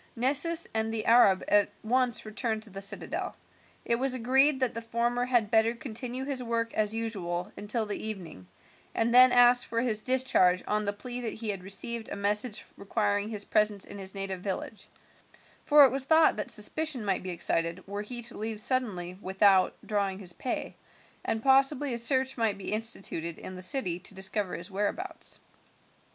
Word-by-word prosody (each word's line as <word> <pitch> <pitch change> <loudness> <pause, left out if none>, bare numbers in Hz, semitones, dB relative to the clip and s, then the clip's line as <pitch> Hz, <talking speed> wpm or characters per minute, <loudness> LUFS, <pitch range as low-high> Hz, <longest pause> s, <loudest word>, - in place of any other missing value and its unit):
Nessus 290 +7 +1
and 220 0 0
the 220 -1 -2
Arab 225 -5 +5
at 205 0 +4
once 245 +1 +1
returned 220 0 -3
to 220 - -10
the 195 +1 -7
citadel. 200 +1 -4 0.5
It 235 - +2
was 260 +1 0
agreed 265 +4 +3
that 255 -3 0
the 230 - -5
former 235 +2 -1
had 240 -4 +1
better 225 +1 +3
continue 250 0 -4
his 270 -2 -2
work 230 -1 -2
as 215 0 0
usual 180 -6 -3
until 220 +2 -2
the 205 - -4
evening, 180 - -5 0.5
and 230 +1 +1
then 255 +1 +9
ask 245 0 +5
for 230 - -1
his 230 -3 -1
discharge 230 -9 +3
on 210 0 0
the 200 - +1
plea 245 +4 -6
that 230 - -4
he 220 -1 -4
had 195 -3 -2
received 220 +4 -3
a - - -4
message 210 +2 -1
requiring 205 0 -1
his 210 -2 -4
presence 210 -2 +1
in 205 - -9
his 190 0 -5
native 195 -2 -3
village, 200 +2 -5 0.8
for 295 -1 +8
it 260 - +3
was 270 0 -2
thought 320 +2 +5
that 210 - -4
suspicion 260 +3 -3
might 195 -2 0
be 185 - -6
excited 170 0 -1
were 200 +1 -4
he 240 +3 -6
to 235 -1 -4
leave 220 0 -3
suddenly 200 -7 0
without 190 -1 +3
drawing 200 -3 -1
his 185 -3 -6
pay, 250 - -4 0.5
and 225 0 -2
possibly 270 0 +3
a 235 - -2
search 260 +2 0
might 220 -3 +1
be 200 - -4
instituted 195 -7 -2
in 185 - -8
the 185 - -8
city 185 -3 0
to 195 +2 -10
discover 190 0 -2
his 180 +4 -8
whereabouts. 210 - -2
220 Hz, 185 wpm, -29 LUFS, 200-245 Hz, 0.8 s, then